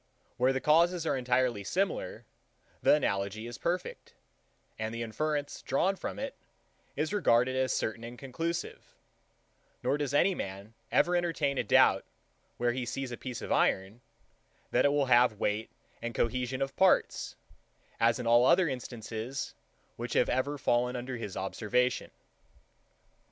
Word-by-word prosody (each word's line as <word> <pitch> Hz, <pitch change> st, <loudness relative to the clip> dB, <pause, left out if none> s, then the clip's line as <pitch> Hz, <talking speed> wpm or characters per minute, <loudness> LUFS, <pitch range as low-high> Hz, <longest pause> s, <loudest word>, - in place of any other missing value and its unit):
Where 125 Hz, +2 st, +3 dB
the 130 Hz, -, 0 dB
causes 170 Hz, +4 st, +3 dB
are -, -, +1 dB
entirely 125 Hz, -4 st, +1 dB
similar, -, -, -2 dB, 0.6 s
the -, -, +6 dB
analogy 100 Hz, -5 st, -1 dB
is 120 Hz, +1 st, -8 dB
perfect, 180 Hz, +1 st, -3 dB, 0.6 s
and 110 Hz, +1 st, -3 dB
the 115 Hz, -, -3 dB
inference, 145 Hz, +5 st, -2 dB
drawn 190 Hz, +8 st, +1 dB
from -, -, -5 dB
it, 275 Hz, 0 st, -4 dB, 0.6 s
is 155 Hz, +5 st, -1 dB
regarded 130 Hz, -, +3 dB
as 130 Hz, -1 st, +1 dB
certain 110 Hz, +1 st, -2 dB
and 120 Hz, +1 st, -8 dB
conclusive: 165 Hz, +7 st, -5 dB, 0.9 s
nor 145 Hz, -, +1 dB
does 145 Hz, -3 st, -1 dB
any 175 Hz, +7 st, +4 dB
man 100 Hz, -, -6 dB, 0.2 s
ever 180 Hz, -, +3 dB
entertain 165 Hz, -6 st, 0 dB
a -, -, +1 dB
doubt, 105 Hz, -, +5 dB, 0.5 s
where 120 Hz, 0 st, +1 dB
he 125 Hz, +1 st, -3 dB
sees 130 Hz, +1 st, -4 dB
a -, -, -3 dB
piece 125 Hz, -2 st, -6 dB
of -, -, -5 dB
iron, 95 Hz, +5 st, +1 dB, 0.7 s
that -, -, +3 dB
it -, -, +6 dB
will 145 Hz, -1 st, +2 dB
have 120 Hz, -4 st, +4 dB
weight 105 Hz, +2 st, -1 dB, 0.3 s
and 120 Hz, -1 st, -4 dB
cohesion 125 Hz, +2 st, 0 dB
of 135 Hz, 0 st, -5 dB
parts; 190 Hz, -1 st, +2 dB, 0.6 s
as 115 Hz, 0 st, +4 dB
in 125 Hz, -, -5 dB
all 120 Hz, +2 st, +5 dB
other 180 Hz, -1 st, +5 dB
instances, 120 Hz, -1 st, -5 dB, 0.4 s
which -, -, -4 dB
have -, -, +3 dB
ever 140 Hz, +3 st, 0 dB
fallen 125 Hz, -1 st, +1 dB
under 125 Hz, +1 st, -4 dB
his 105 Hz, -5 st, -6 dB
observation. 120 Hz, +6 st, 0 dB
125 Hz, 150 wpm, -30 LUFS, 115-150 Hz, 0.9 s, the